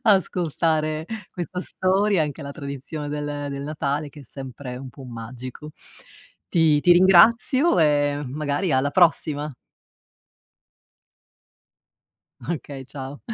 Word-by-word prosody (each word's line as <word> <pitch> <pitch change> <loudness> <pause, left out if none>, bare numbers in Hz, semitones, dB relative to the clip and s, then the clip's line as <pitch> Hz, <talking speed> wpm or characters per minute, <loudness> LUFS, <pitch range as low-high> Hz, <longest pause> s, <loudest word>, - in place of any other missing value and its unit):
ascoltare 160 -6 +1 0.3
questa 180 0 -5
storia, 190 0 +1
anche 150 +1 -4
la 140 0 -6
tradizione 140 +1 -6
del 145 0 -4
del 140 0 -5
Natale 145 0 -2
che 145 +1 -13
è - - -11
sempre 130 0 -8
un 130 +1 -8
può 135 - -13
magico. 125 +5 -8 0.8
Ti 160 -3 +3
ti 175 - +6
ringrazio 220 - +5
e, 145 -2 +2
magari, 150 +6 -1
alla 135 +2 +2
prossima. 150 -4 +2 2.9
Okay, 140 -5 -5
ciao. 135 +1 -8
150 Hz, 110 wpm, -23 LUFS, 140-170 Hz, 2.9 s, ti